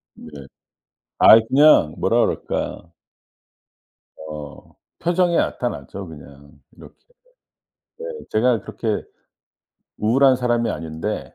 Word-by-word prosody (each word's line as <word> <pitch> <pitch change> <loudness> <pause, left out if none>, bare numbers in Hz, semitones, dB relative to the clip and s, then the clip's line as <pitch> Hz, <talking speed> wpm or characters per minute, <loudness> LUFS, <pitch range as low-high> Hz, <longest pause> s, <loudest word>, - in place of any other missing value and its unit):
네. - - -13 0.9
아이 110 - +8
그냥 135 - +5
뭐라 - - +1
그럴까 85 - -3 1.4
어 75 -2 -10 0.3
표정에 175 0 +1
나타나죠 95 - -3
그냥. 70 -2 -14 0.3
이렇게. - - -15 1.0
네. 475 - -7 0.3
제가 115 -1 +2
그렇게 110 +1 -4 1.0
우울한 130 +4 +3
사람이 120 -2 0
아닌데 80 +6 -5
110 Hz, 200 characters per minute, -21 LUFS, 80-125 Hz, 1.4 s, 아이